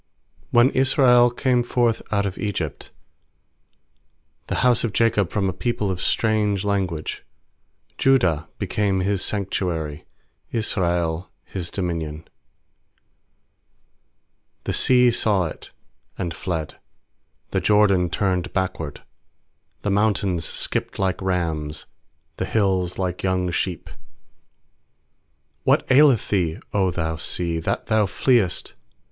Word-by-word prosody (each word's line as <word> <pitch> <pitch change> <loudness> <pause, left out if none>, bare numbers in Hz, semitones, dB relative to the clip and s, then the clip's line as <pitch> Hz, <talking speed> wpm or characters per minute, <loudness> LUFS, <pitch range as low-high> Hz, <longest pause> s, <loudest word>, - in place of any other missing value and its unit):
When 120 +3 +5
Israel 130 -2 +5
came 125 0 +1
forth 120 -1 +1
out 100 -1 +1
of 95 -2 -4
Egypt, 90 -8 -4 1.6
The - - -2
house 125 -2 +4
of 115 -4 -2
Jacob 110 -5 +2
from 100 0 0
a 95 - -1
people 105 0 -1
of 90 -1 -4
strange 105 -3 +1
language; 95 -6 -2 0.8
2Judah 90 - +3
became 100 -1 0
His 100 0 0
sanctuary, 90 -7 -2 0.5
Israel 85 -6 0 0.2
His 90 -3 -5
dominion. 85 -4 -4 2.4
3The - - -1
sea 125 -1 +5
saw 105 -5 +2
it, 80 - -8 0.5
and 85 -2 -3
fled; 80 -4 -4 0.7
The - - 0
Jordan 100 -4 +3
turned 90 -1 -1
backward. 80 -6 -3 0.8
4The 100 - 0
mountains 100 -4 +1
skipped - - -2
like 95 -1 -1
rams, 80 -5 -2 0.5
The - - -2
hills 95 -4 0
like 90 -2 -2
young 90 -1 0
sheep* 85 -1 -2 1.8
8What - - +4
aileth 135 -4 +5
thee, 85 -5 0
0 95 -2 +2
thou 80 -2 -2
sea, 85 +1 -2
that 80 - -2
thou 110 -2 +2
fleest? 105 -2 +1
95 Hz, 110 wpm, -23 LUFS, 85-110 Hz, 2.4 s, When